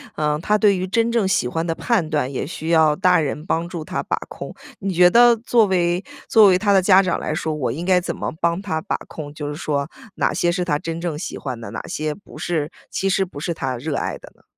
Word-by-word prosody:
嗯， 150 -1 0
他 210 +4 +2
对 200 -2 +4
于 185 - -2
真 230 +5 +1
正 230 -5 +2
喜 190 -9 +1
欢 165 +6 -2
的 165 - 0
判 200 -1 0
断 145 -4 -1
也 130 - -3
需 160 0 -7
要 160 -2 +4
大 180 0 +4
人 150 0 -2
帮 165 +1 0
助 170 -3 -6
他 - - -3
把 - - -1
控。 - - -8 0.3
你 195 -1 -2
觉 180 +1 +6
得 240 +4 +6
作 230 0 +3
为 180 -1 +1 0.3
作 220 -3 +7
为 185 -2 +5
他 205 0 +2
的 195 -1 +5
家 190 0 +6
长 185 -3 -1
来 - - -3
说， 160 0 -2
我 125 -6 -1
应 160 +7 -5
该 180 0 +4
怎 180 - -4
么 - - -3
帮 170 +2 0
他 170 -6 -2
把 - - -2
控， 145 -2 -8
就 150 -1 -5
是 145 - -4
说 145 -1 -2 0.3
哪 - - +1
些 175 - +1
是 180 +1 -1
他 150 -5 0
真 165 +2 -5
正 170 -4 -3
喜 170 - -5
欢 130 -4 -5
的， 115 -3 -8
哪 110 - -5
些 155 0 -2
不 200 - -15
是 160 -2 -2 0.2
其 195 - -1
实 195 0 +2
不 175 -6 -10
是 165 +2 -3
他 135 -4 -3
热 145 +4 -3
爱 - - -2
的 - - -14
呢？ - - -28
170 Hz, 280 characters per minute, -21 LUFS, 150-190 Hz, 0.3 s, 作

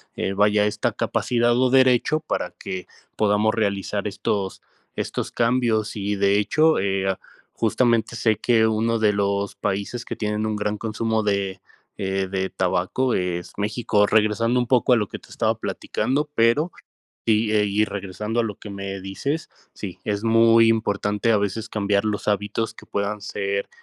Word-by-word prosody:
eh, 95 - -2
vaya, 105 +1 +3
esta 105 0 0
capacidad 120 -1 +1
o 130 +1 +3
derecho 130 +3 +4
para 155 - -3
que 95 -1 -7 0.3
podamos 105 +1 +2
realizar 100 -1 -1
estos 100 -1 -2 0.3
estos - - -3
cambios 115 -2 +1
y, 105 0 -2
de 100 +1 +3
hecho, 155 +9 +3
eh, 95 0 0 0.4
justamente 115 0 +1
sé 110 -1 +1
que 115 -2 +3
uno 110 +1 +1
de 105 -1 +3
los 100 0 -1
países 100 +5 -3
que - - -5
tienen 105 0 -2
un 110 0 -1
gran 105 0 -2
consumo 110 0 -1
de, 100 -2 -1 0.4
eh, 95 0 -1
de 95 0 -1
tabaco, 95 +8 0
es 90 -1 -2
México. 105 0 +1
Regresando 110 +3 +2
un 120 - -1
poco 125 0 +4
a - - +6
lo 105 -3 0
que - - -7
te - - -19
estaba - - 0
platicando, 150 +3 -2
pero 120 +9 +3 0.5
y, 110 -1 +2
eh, 105 -1 +3
y 105 +1 +2
regresando 105 +3 -3
a - - +2
lo 105 -2 -3
que 105 - -10
me 100 0 -5
dices 95 - -3 0.3
sí, 95 -4 -7
es 100 -1 -2
muy 115 0 +5
importante 105 0 +1
a - - +4
veces 100 +3 -2
cambiar 100 -2 0
los 105 -1 -2
hábitos 105 +2 -1
que - - -14
puedan 100 +1 -2
ser, 100 -1 -3
105 Hz, 165 wpm, -23 LUFS, 100-115 Hz, 0.5 s, a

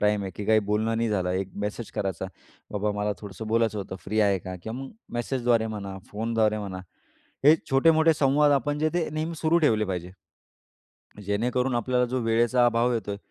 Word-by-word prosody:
Time 105 -1 +2
आहे 95 - -4
की 105 - -4
काही 110 0 +5
बोलणं 110 +2 +1
नाही 115 0 0
झालं, 95 -4 0
एक 95 +1 -1 0.2
मेसेज 105 +2 -5
करायचा, 95 -2 -2 0.5
"बाबा, 105 0 0
मला 105 0 0
थोडंसं 105 +1 -8
बोलायचं 110 -1 +1
होतं 95 -1 -5
फ्री 110 +2 0
आहे 100 -2 +3
का?" 95 +1 -7
किंवा 110 +3 -5
मग - - -9 0.2
मेसेजद्वारे 120 -2 +1
म्हणा, 100 -3 -5
फोनद्वारे 110 0 0
म्हणा. 100 -3 -5 0.7
हे 150 +2 +9 0.2
छोटे-मोठे 160 +4 +5
संवाद 145 0 +3
आपण 145 +1 0
जे 155 +1 +2
ते 175 -2 0
नेहमी 160 +2 -2
सुरू 160 +2 +2
ठेवले 110 -6 +3
पाहिजे, 90 -2 -4 1.1
जेणेकरून 125 +5 0
आपल्याला 125 +1 +1
जो 130 +2 -2
वेळेचा 120 +2 +3
अभाव 120 +1 +2
येतोय, 100 -3 -3
110 Hz, 180 wpm, -26 LUFS, 105-125 Hz, 1.1 s, हे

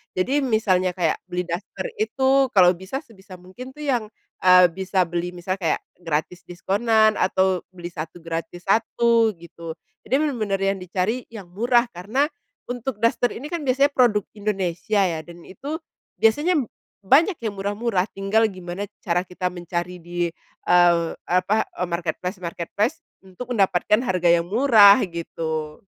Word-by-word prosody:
Jadi 255 +11 +1
misalnya 200 -8 +1
kayak, 170 -4 0
beli 180 0 -2
daster 175 +3 -5 0.2
itu 270 -9 +2
kalau 180 -2 +7
bisa 190 - -6
sebisa 200 -6 -14
mungkin 190 +9 -11
tuh 300 - -8
yang, 245 -7 0 0.3
eee, 180 -1 +6
bisa 190 +1 0
beli, 175 +1 -4
misalnya 185 +2 -3
kayak - - 0 0.2
gratis 165 +1 -3
diskonan, 215 +5 +2
atau 190 -1 +2 0.2
beli 175 -1 -7
1 165 +1 -7
gratis 165 +1 -5
1 225 +2 +2
gitu. 165 -1 -9 0.3
Jadi 255 - +2
bener-bener 235 -10 0
yang 195 0 0
dicari, 185 +7 -2
yang 200 -6 -11
murah, 240 +4 +2
karena 205 +11 -1 0.4
untuk 245 -2 -4
daster 230 +2 +2
ini 275 - -7
kan 335 0 -4
biasanya 275 +1 +3
produk 215 -6 +3
Indonesia 200 -1 -1
ya, 170 -5 0
dan 170 +1 -13
itu 290 +11 -6 0.4
biasanya 295 +10 +3 0.4
banyak 295 - +3
yang 220 -3 -4
murah-murah, 205 0 -1
tinggal 195 +3 +1
gimana 185 +1 -6 0.2
cara 175 -1 0
kita 180 0 -4
mencari 175 0 -4
di, 175 0 -2 0.4
eee, 175 -1 +5 0.2
apa, 185 +5 +1 0.2
eee, 180 - 0
marketplace-marketplace 180 - -3 0.2
untuk 230 +7 -7
mendapatkan 200 +3 +2
harga 185 -6 0
yang 170 0 +4
murah 220 -4 +7
gitu. 160 -2 -5
190 Hz, 145 wpm, -23 LUFS, 175-230 Hz, 0.4 s, kalau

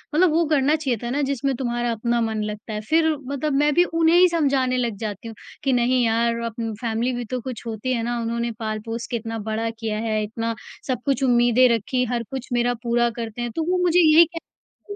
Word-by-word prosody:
मतलब 350 0 +4
वो 330 +1 +2
करना 295 -1 +2
चाहिए 275 -7 -1
था 240 - -3
ना 285 +4 -1
जिसमें 275 -1 -1
तुम्हारा 240 -1 -1
अपना 235 +1 0
मन 220 -1 -1
लगता 210 +1 -6
है 210 - -3
फिर 320 0 +4 0.2
मतलब 280 +1 -2
मैं 295 +1 +3
भी 350 - +5
उन्हें 330 -1 +3
ही 365 - +7
समझाने 270 -6 +1
लग 235 -4 -1
जाती 210 0 -5
हूँ 225 - -8 0.3
कि 270 -2 +2
नहीं 245 +1 +2
यार 230 +1 +1
अब 230 - -4 0.3
फैमिली 235 +2 -1
भी 240 -1 -4
तो 255 +3 -3
कुछ 250 -2 -7
होती 230 +3 -2
है 230 - -1
ना? 240 +1 -2
उन्होंने 235 +1 -2
पाल-पोस 225 +1 -4
के 240 - -2
इतना 225 0 -5
बड़ा 225 +1 -1
किया 225 -1 -4
है 215 -1 -1
इतना 225 +2 -3 0.3
सब 255 -3 -1
कुछ 275 -1 0
उम्मीदें 245 0 +4
रखीं 250 +4 -1
हर 235 -1 -1
कुछ 265 -2 -5
मेरा 245 0 +2
पूरा 240 0 +2
करते 230 0 -6
हैं, 240 - -3
तो 320 - -2
वो 365 - +2
मुझे 355 0 +4
ये 325 0 +7
कह 405 +4 -12
240 Hz, 225 wpm, -23 LUFS, 230-275 Hz, 0.3 s, ही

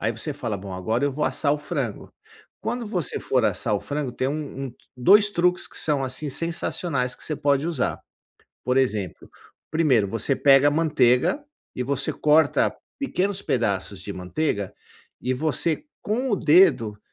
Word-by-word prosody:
ai 115 +3 0
você 130 +7 -4
fala: 115 -6 -3
"Bom, 95 0 -8
agora 110 +7 -1
eu 140 - 0
vou 150 +2 -1
assar 145 -2 +1
o 150 - -1
frango". 140 - -4 0.5
Quando 240 0 -3
você 180 -7 -1
for 130 -2 +1
assar 110 - 0
o 100 - -1
frango, 145 -4 -3
tem 130 +2 -1
um 140 -2 -4
um 125 - -10 0.2
2 205 +11 +5
truques 180 -2 +1
que - - -7
são, 145 -3 +1
assim, 130 +3 -4
sensacionais 160 -4 -1
que - - -9
você 155 - -2
pode 140 +1 +1
usar. 165 -6 -1 0.7
Por 125 +1 +1
exemplo, 110 -9 -1 0.4
primeiro, 140 -10 +3
você 115 +6 0
pega 140 0 +6
manteiga 150 - +3 0.4
e 125 - -1
você 140 0 -1
corta 155 0 +3 0.2
pequenos 200 -8 -1
pedaços 100 -5 -1
de 100 - -6
manteiga 100 - -2 0.5
e 130 - 0
você, 155 - -1 0.2
com 250 +5 -1
o - - +3
dedo, 150 - +4
140 Hz, 165 wpm, -24 LUFS, 120-160 Hz, 0.7 s, pega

